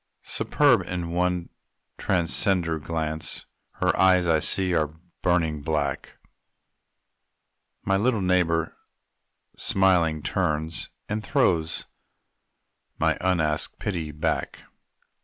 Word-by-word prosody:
Superb - - +2
in 85 -2 -3
one 90 0 0 0.5
transcendent 85 -3 0
glance 80 -1 -3 0.3
Her - - +1
eyes, 90 -1 +4
I 80 -1 +4
see, 95 +3 +3
are 75 -3 +1 0.3
burning 80 -4 +1
black 75 -2 -2 1.7
My 95 0 +2
little 115 +2 +1
neighbor, 85 -3 +1 0.8
smiling, 85 -5 +2
turns, 80 -3 -2 0.2
And 105 +1 -3
throws 85 - +1 1.1
my - - +2
unasked 80 -5 0
pity 85 -6 -3
back. 80 +2 -2
85 Hz, 90 wpm, -25 LUFS, 80-95 Hz, 1.7 s, eyes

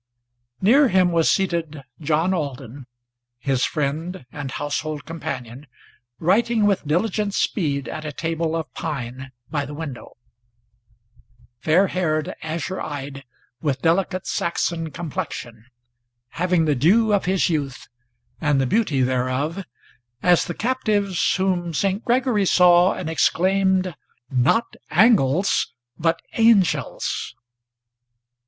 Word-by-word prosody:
Near 265 +9 +5
him 185 -5 +3
was 165 -1 +3
seated 170 -6 -1 0.2
John 160 +4 +1
Alden, 135 -5 -5 0.5
his 130 +1 0
friend, 155 +2 -3
and 145 -2 -6
household 145 +2 -3
companion, 140 -5 -6 0.5
Writing 215 - +2
with 195 -7 +1
diligent 200 +5 0
speed 140 -8 0
at 155 - -6
a 150 - -4
table 165 +1 -2
of 160 -6 -4
pine 130 -3 -5 0.2
by 145 -3 0
the 145 +1 -7
window; 145 -5 -8 1.4
Fair 165 +8 +3
haired, 155 -5 -1
azure 165 +4 -4
eyed, 140 -2 -6 0.4
with 145 -3 -1
delicate 180 +2 +1
Saxon 170 -1 -1
complexion, 125 -8 -6 0.6
Having 175 0 +1
the 150 - +2
dew 205 - +3
of 200 - +1
his 190 0 +2
youth, 145 -6 -3 0.5
and 145 -3 +2
the 135 - +2
beauty 150 - +1
thereof, 130 +8 -1 0.6
as 180 -1 +4
the 175 - -5
captives 210 -6 0
Whom 180 -3 -1
Saint 195 +5 0
Gregory 240 -5 +2
saw, 180 0 +5
and 185 - -5
exclaimed, 185 +4 +2 0.4
"Not 135 - +2
Angles, 180 - +3 0.2
but 165 0 0
Angels." 190 - +2
165 Hz, 115 wpm, -22 LUFS, 145-190 Hz, 1.4 s, Near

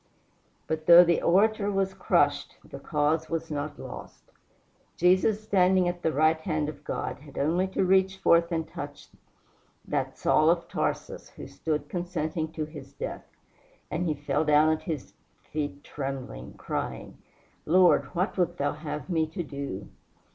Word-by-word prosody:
But 155 0 -3
though 175 +1 +10
the 170 -1 +2
orator 205 +3 +3
was 195 -1 0
crushed - - +1
the - - -9
cause 155 +1 0
was 165 -1 -3
not 145 0 -4
lost. - - -10 0.7
Jesus, 185 +5 +3
standing 185 -3 +3
at 175 0 -3
the 160 - +1
right 155 +2 +3
hand 155 -1 -1
of 155 - -10
God, - - -4
had 145 -1 -14
only 170 +6 +1
to 190 0 0
reach 190 +1 +3
forth 170 -1 +3
and 160 -1 -1
touch - - -8 0.8
that - - -2
Saul 155 +1 +3
of 170 0 +1
Tarsus - - -3
who - - -10
stood 150 -2 -3
consenting 165 -3 -3
to 155 - -3
his 150 -3 -11
death, - - -6 0.6
and 175 +3 -1
he 155 - 0
fell 145 +1 -1
down 150 0 +4
at 160 0 0
his 155 -5 -5 0.4
feet 145 -1 -4
trembling, 135 - -6
crying, - - -5 0.5
"Lord, 180 +2 +5
what 185 +3 -1
wilt 175 -1 +1
thou 145 - 0
have 150 -1 -6
me 160 -4 +1
to 165 +3 -5
do?" 140 - -6
160 Hz, 155 wpm, -27 LUFS, 150-180 Hz, 0.8 s, though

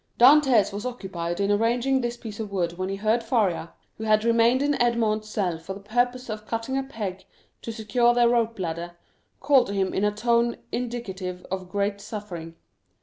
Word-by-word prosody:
Dantès 255 -5 +6
was 205 +1 -4
occupied 190 -8 -4
in 200 0 +1
arranging 240 +5 +2
this 240 0 -3
piece 220 -3 -8
of 215 -2 -4
wood 175 -3 -1
when 185 0 -2
he 195 - -2
heard 215 +4 +1
Faria, 210 -8 0 0.3
who - - -4
had 215 0 +3
remained 235 +3 +3
in 290 0 +2
Edmond's 220 -3 +1
cell 180 -6 -1
for 190 +4 -7
the - - -9
purpose 245 +5 -1
of 215 -1 -6
cutting 230 +3 -3
a 270 - +1
peg 215 -8 -5 0.4
to 230 - -5
secure 225 +2 +2
their 240 0 +4
rope 230 -1 +1
ladder, 175 -1 -4 0.4
call 275 -2 +5
to 200 - -5
him 190 -1 0
in 195 - 0
a 210 - +3
tone 235 +2 +1
indicative 195 -7 -4
of 185 -1 -4
great 200 +1 -1
suffering. 175 -7 -7
215 Hz, 190 wpm, -25 LUFS, 195-240 Hz, 0.4 s, Dantès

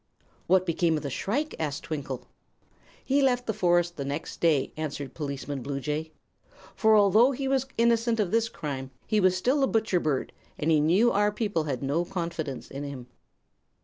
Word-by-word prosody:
"What 185 +1 +4
became 165 -1 +1
of 150 - -5
the 140 - -4
shrike?" 280 - -2
asked 145 -3 -3
Twinkle. 140 -5 -5 0.8
"He 275 +1 +2
left 250 -2 +2
the 220 - -1
forest 175 -3 +2
the 140 - -3
next 140 +3 -5
day," 155 -5 +2
answered 145 -3 -5
Policeman 140 -2 -4
Bluejay. 150 +4 -3 0.6
"For 220 -1 +4
although 215 +6 +5
he 270 +1 -3
was 270 -1 +1
innocent 230 0 +2
of 195 -4 +1
this 230 0 +2
crime, 135 -7 -5 0.2
he 215 - +1
was 185 -1 +3
still 255 +9 +1
a - - +4
butcher 220 -6 +1
bird, 150 -5 -1 0.2
and 155 +2 0
he 155 - +5
knew 185 +11 +4
our 205 +1 +2
people 205 -7 -1
had 135 -3 -3
no 145 +5 +1
confidence 170 -6 -5
in 140 +1 -5
him." 135 -4 -7
170 Hz, 180 wpm, -27 LUFS, 145-220 Hz, 0.8 s, although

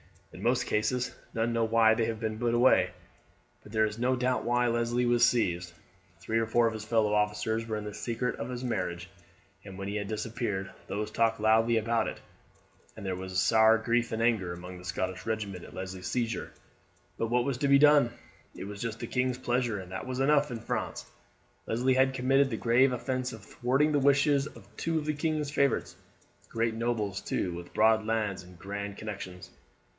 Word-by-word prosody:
In 90 - -10
most 120 +3 +1
cases 125 +4 0 0.2
none 115 +1 0
know 115 -1 +2
why 110 0 +5
they 115 0 +1
have 110 -1 -3
been 110 -1 -3
put 120 -1 +1
away; 120 -6 +5 0.7
but 105 - -15
there 110 0 +3
is 110 +1 -4
no 125 +2 +2
doubt 125 -1 0
why 120 +1 +2
Leslie 120 +1 +1
was 120 0 +3
seized. 90 -8 +2 0.5
Three 110 +5 -1
or 115 - 0
four 120 +1 +3
of 115 - +1
his 110 -1 -6
fellow 110 -2 +2
officers 105 +2 0
were 110 - -2
in 105 - -5
the 105 -1 -6
secret 120 +3 -2
of 115 - -5
his 125 0 -5
marriage, 90 -6 -3 0.5
and 95 -2 -10
when 100 0 -5
he 105 - -2
had 100 -1 -3
disappeared 105 -3 -3 0.2
these 105 +1 -3
talked 115 0 +1
loudly 110 +2 +4
about 115 +1 +1
it, - - -5 0.8
and - - -8
there 95 -1 -1
was 95 0 -2
sair 110 +2 +5
grief 120 +1 0
and 110 +1 -1
anger 105 -7 +1
among 90 +1 -9
the 90 - -12
Scottish 90 +2 -3
regiment 100 -5 -3
at - - -13
Leslie's 95 -1 -6
seizure. 120 -2 -2 0.7
But 115 - -1
what 120 +1 +2
was 140 -3 -1
to 140 - +1
be 140 0 +6
done? 145 -3 +6 0.5
It - - -7
was 100 +1 -7
just 115 -1 -4
the 120 - -4
king's 125 0 0
pleasure, 120 -4 -1
and 95 -1 -10
that 95 +7 -5
is 130 0 -3
enough 145 +1 +3
in 115 -2 -5
France. - - -3 0.6
Leslie 125 +3 +2
had 130 +1 +3
committed 135 +2 +3
the 115 - -3
grave 125 +4 +4
offence 130 +1 -2
of 110 -2 -10
thwarting 135 +8 +1
the 145 - +3
wishes 140 +1 +3
of - - -13
two 165 -1 -1
of 150 - -2
the 155 - 0
king's 150 -1 -1
favourites, 140 -2 +1 0.5
great 115 0 0
nobles, 110 -4 -2
too, 90 - -2
with 85 0 -9
broad 110 0 +4
lands 110 -3 -1
and 90 -1 -15
grand 100 +2 -5
connections. 95 -4 -7
115 Hz, 200 wpm, -29 LUFS, 105-125 Hz, 0.8 s, be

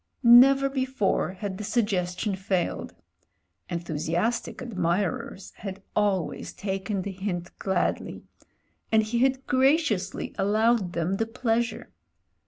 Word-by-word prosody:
Never 265 +3 +8
before 260 -8 0
had 190 0 -5
the - - -4
suggestion 205 -3 0
failed; 190 -2 -2 0.7
enthusiastic 175 +7 -2
admirers 185 -4 -2
had 195 -1 -7
always 200 -5 0
taken 195 0 -3
the' 200 - -4
hint 180 -2 -4
gladly, 190 -2 -1 0.7
and 220 0 +5
he 230 +2 -1
had 265 +1 +1
graciously 260 - +1
allowed 215 -1 +2
them 170 +3 -1
the 225 - -1
pleasure. 235 0 -1
205 Hz, 105 wpm, -26 LUFS, 185-235 Hz, 0.7 s, Never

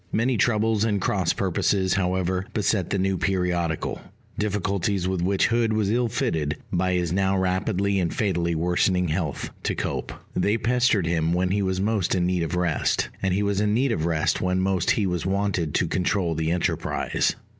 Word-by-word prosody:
Many 120 +3 +1
troubles 110 -1 +2
and 105 -3 +1
cross - - +1
purposes, 95 -2 +1
however, 95 -1 0
beset 100 -3 +1
the 100 - 0
new 95 0 0
periodical; 90 -4 -1 0.3
difficulties 100 -2 -1
with 95 -2 -1
which 95 +2 +2
Hood 115 -1 +1
was 105 -2 +1
ill 120 +1 +2
fitted, 80 - -1 0.2
by 90 +1 +1
his 90 -2 0
now 95 0 +1
rapidly 95 +1 0
and 85 -2 0
fatally 85 -5 0
worsening 90 +1 +1
health, 80 -3 -2
to - - -1
cope. - - -3 0.2
They 100 +4 +2
pestered 120 -4 +2
him 85 -1 +1
when 90 +1 +1
he 100 +1 +1
was 95 -1 -1
most 100 -2 0
in 90 -1 +1
need 90 -1 0
of 85 +1 -2
rest; 90 -3 0
and 95 - 0
he 100 +3 +1
was 100 0 0
in 105 0 +1
need 130 +2 +2
of 80 -7 0
rest 80 -2 0
when 90 0 +1
most 95 -2 0
he 105 - +2
was 90 -1 -2
wanted 95 -5 -1
to - - +2
control 90 -2 0
the 80 0 -1
enterprise. 85 +1 0
95 Hz, 185 wpm, -24 LUFS, 90-100 Hz, 0.3 s, troubles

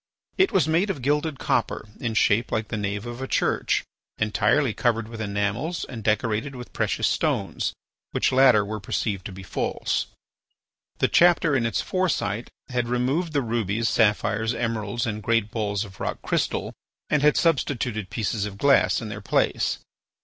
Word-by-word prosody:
It 385 - +4
was 185 -4 +3
made 170 +6 +2
of 145 -10 -3
gilded 150 +2 0
copper 105 - -1
in 115 -2 -2
shape 110 +1 +3
like 110 0 -1
the - - -2
nave 105 +1 -3
of 120 +1 -6
a 135 - -3
church, - - +1 0.3
entirely 110 +4 +2
covered 115 -1 0
with 115 -1 -7
enamels 105 - -2
and 115 -4 -8
decorated 115 +5 0
with 125 -1 -9
precious - - 0
stones, - - 0 0.4
which - - +1
latter 130 -5 +5
were 105 +1 -4
perceived 100 0 -2
to - - -9
be 95 +1 -9
false. - - -1 0.9
The - - +3
chapter 170 -4 +4
in 115 -3 +2
its 115 - 0
foresight 125 - -1 0.2
had 125 -2 -1
removed 135 +8 0
the 140 -2 +1
rubies, 115 -1 0
sapphires, 110 +1 +2
emeralds, 115 -1 -2
and 110 -2 -3
great 110 -1 +1
balls 105 -2 -1
of 95 -2 -14
rock - - -3
crystal, - - -1 0.3
and 150 - +2
had 150 +1 +4
substituted 125 - 0
pieces 110 -2 -1
of 100 -1 -9
glass 140 +2 +4
in 110 - -5
their 105 +1 -6
place. - - +1
115 Hz, 165 wpm, -25 LUFS, 105-135 Hz, 0.9 s, latter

